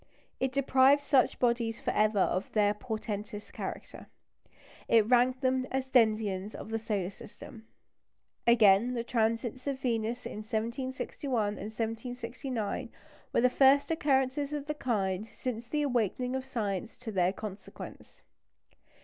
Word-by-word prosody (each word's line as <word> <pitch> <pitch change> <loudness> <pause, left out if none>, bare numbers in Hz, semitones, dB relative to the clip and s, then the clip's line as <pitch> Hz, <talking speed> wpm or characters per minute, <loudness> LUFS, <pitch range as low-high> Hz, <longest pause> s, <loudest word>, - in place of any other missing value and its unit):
It 265 0 0
deprived 275 +1 +4
such 275 -3 +3
bodies 235 -2 +1
for - - -1
ever 215 0 +2
of 185 0 +1
their 205 -1 +3
portentous 210 -2 -5
character; - - -7 0.8
it 225 -2 +5
ranked 250 +2 +3
them 260 -1 +1
as 265 0 -2
denizens 215 -5 +2
of - - -8
the 225 - -1
solar 205 -4 -2
system. 220 +2 -12 0.8
Again, 230 +1 +5
the 235 - -1
transits 230 +2 -1
of 275 -1 -1
Venus 235 -1 -1
in - - -6
1761 235 +1 -2
and 205 - -5
1769 230 +1 -4 0.4
were - - +2
the 250 - +6
first 270 +4 +4
occurrences 280 -2 +1
of 290 -1 -3
the 300 - -2
kind 210 -7 -1
since 235 -1 -5
the 295 +4 0
awakening 250 -1 0
of 265 0 -3
science 215 -4 -3
to 235 -3 -6
their 185 -2 +2
consequence. 205 0 -9
235 Hz, 135 wpm, -30 LUFS, 215-260 Hz, 0.8 s, the